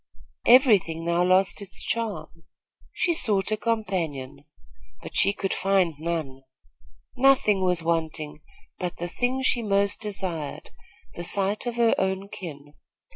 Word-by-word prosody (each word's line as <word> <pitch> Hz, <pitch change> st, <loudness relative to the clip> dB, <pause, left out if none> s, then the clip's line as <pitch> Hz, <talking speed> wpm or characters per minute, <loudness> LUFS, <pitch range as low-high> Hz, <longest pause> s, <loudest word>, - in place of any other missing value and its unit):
Every 245 Hz, -4 st, +7 dB
thing 165 Hz, -1 st, -7 dB
now 170 Hz, +1 st, +2 dB
lost 185 Hz, +2 st, +2 dB
its 195 Hz, -1 st, -7 dB
charm. 170 Hz, -8 st, -4 dB, 0.5 s
She 345 Hz, -, 0 dB
sought 210 Hz, -, +1 dB
a -, -, +3 dB
companion; 170 Hz, -, -3 dB, 0.6 s
but -, -, -9 dB
she 200 Hz, -, +4 dB
could 200 Hz, -1 st, -3 dB
find 195 Hz, -3 st, +2 dB
none. 155 Hz, -5 st, -3 dB, 0.7 s
Nothing 250 Hz, -7 st, +4 dB
was 180 Hz, -2 st, +1 dB
wanting 160 Hz, -2 st, -2 dB, 0.4 s
but 180 Hz, -2 st, -4 dB
the 175 Hz, -, -4 dB
thing 250 Hz, +8 st, -1 dB
she 245 Hz, -2 st, +2 dB
most 200 Hz, -1 st, +1 dB
desired 185 Hz, -8 st, -4 dB, 0.4 s
the 175 Hz, -, -6 dB
sight 200 Hz, +5 st, -1 dB
of 240 Hz, -, -2 dB
her 235 Hz, -1 st, +3 dB
own 190 Hz, +1 st, -1 dB
kin. 145 Hz, -7 st, -9 dB
190 Hz, 135 wpm, -25 LUFS, 165-210 Hz, 0.7 s, Every